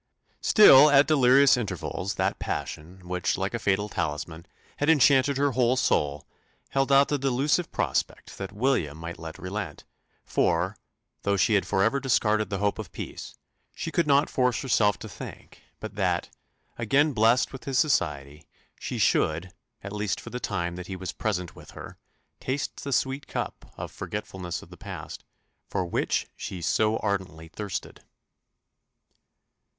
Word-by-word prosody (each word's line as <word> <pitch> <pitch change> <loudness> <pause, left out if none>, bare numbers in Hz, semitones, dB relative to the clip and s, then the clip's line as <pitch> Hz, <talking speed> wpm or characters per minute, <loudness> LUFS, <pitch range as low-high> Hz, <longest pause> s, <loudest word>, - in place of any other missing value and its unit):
Still, 150 -9 +8
at 145 0 +6
delirious 135 -2 +5
intervals, 105 -3 -3
that - - -1
passion, 90 +4 -5
which, 90 0 -1
like 95 +3 -2
a 120 - -2
fatal 100 0 +1
talisman, 80 -1 -4 0.3
had 145 - 0
enchanted 140 -2 +5
her 140 0 +2
whole 125 0 +2
soul, 75 - +1 0.4
held 135 0 0
out 140 +1 +5
the 145 - 0
delusive 135 +6 +1
prospect - - -2
that 95 -1 -5
"William 105 - 0
might 85 +1 -7
yet 80 -1 -8
relent;" 95 -4 -5 0.4
for, - - +1 0.5
though 100 0 +1
she 110 - +3
had 100 - +2
for 95 - +2
ever 115 +6 +2
discarded 110 -5 +1
the 100 - -2
hope 100 +1 0
of - - -7
peace, - - -8 0.4
she 165 - -4
could 170 -2 +1
not 140 +1 +4
force 125 -2 0
herself 105 -6 +2
to - - -9
think - - -10 0.2
but - - -7
that, - - -1 0.5
again 140 +6 +2
blest 115 +4 +3
with 135 - -9
his 135 -2 -1
society, 75 - 0 0.3
she - - -4
should, 80 +4 +1 0.3
at 100 +1 -6
least 105 -2 -2
for - - -10
the 125 - -4
time 85 -6 -3
that 90 0 -7
he 95 - -5
was 95 0 -5
present 90 -6 -3
with - - -14
her, - - -10 0.4
taste 135 +2 -3
the 140 - -4
sweet 135 +2 -1
cup - - -5
of - - -6
"forgetfulness 90 -3 -5
of - - -17
the - - -12
past," - - -8 0.5
for 95 - -1
which 85 - -1
she 95 - -6
so 110 +6 +1
ardently 95 -6 -3
thirsted. 100 +3 -6
105 Hz, 160 wpm, -26 LUFS, 90-135 Hz, 0.5 s, Still